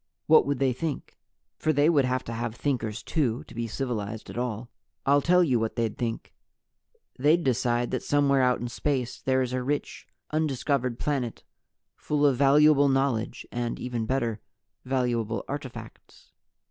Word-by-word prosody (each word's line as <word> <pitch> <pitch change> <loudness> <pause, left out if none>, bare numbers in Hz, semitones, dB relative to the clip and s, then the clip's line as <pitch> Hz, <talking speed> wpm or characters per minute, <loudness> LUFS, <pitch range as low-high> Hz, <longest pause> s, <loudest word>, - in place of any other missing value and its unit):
What 155 -2 +6
would 140 -1 0
they 130 -1 +2
Think? 155 +2 -5 0.4
for 155 - +2
they 145 0 +3
would 150 -5 +4
have 130 0 -1
to 115 - -6
have 115 0 -3
Thinkers 120 -5 -2
too, 125 -7 -1
to - - -15
be 115 0 -3
civilized 110 -3 -4
at - - -9
all. 120 -1 -3 0.4
"I'll 140 +1 +4
tell 180 +4 +4
you 130 -8 +2
what 110 0 -2
they'd 115 -3 -1
Think. 115 -2 -4 0.9
They'd 155 +6 +4
decide 120 -1 +1
that - - -1
somewhere 140 -2 +2
out 125 -1 +2
in 120 - -3
space 130 0 -2
there 130 0 +2
is 125 0 -4
a 130 - -1
rich, 145 +3 -3 0.2
undiscovered 140 -5 0
planet 130 -6 -2 0.5
full 150 -1 0
of 140 -2 +4
valuable 145 +1 +5
knowledge 135 -4 0
and, 120 -1 -3
even 120 -3 -3
better, 115 -4 -1 0.5
valuable 120 -4 -1
artifacts. 140 -3 -9
130 Hz, 160 wpm, -27 LUFS, 120-145 Hz, 0.9 s, What